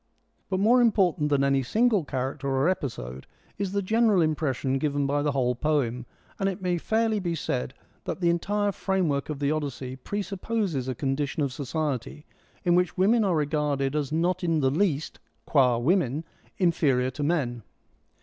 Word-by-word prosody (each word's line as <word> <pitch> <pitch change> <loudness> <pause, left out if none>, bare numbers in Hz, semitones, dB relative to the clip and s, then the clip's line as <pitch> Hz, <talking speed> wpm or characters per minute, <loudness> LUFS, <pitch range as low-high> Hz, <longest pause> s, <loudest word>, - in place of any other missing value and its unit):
But 190 -1 0
more 235 +5 +5
important 185 -9 +2
than 140 -1 +2
any 140 0 +3
single 215 - +2
character 135 +1 -3
or 135 +2 +1
episode 70 - -3 0.3
is 200 -2 -1
the 200 0 -1
general 220 0 +3
impression 140 -4 0
given 145 -1 0
by 145 +1 +1
the 145 -1 0
whole 125 -2 +1
poem, 125 -3 -1 0.3
and 195 - +1
it 195 - -5
may 180 -2 -1
fairly 220 +2 +1
be 175 -3 -2
said 65 - -3 0.3
that - - -3
the 170 -2 +3
entire 205 +4 0
framework 180 -9 -1
of 150 - -3
the 140 +1 0
Odyssey 135 -4 -3
presupposes 195 - -3
a 130 - -2
condition 140 +3 -1
of 135 -2 -2
society 145 0 -3 0.4
in 175 - +3
which 180 0 +1
women 215 +5 +4
are 190 -4 +2
regarded 145 -2 0
as 150 -2 -1
not 175 +3 0
in 165 -3 +1
the 130 -1 +2
least, 160 -2 0 0.3
qud 125 -5 +3
women, 155 -2 +1 0.3
inferior 140 -8 +2
to 130 - -7
men. 145 -7 0
150 Hz, 170 wpm, -26 LUFS, 135-185 Hz, 0.4 s, more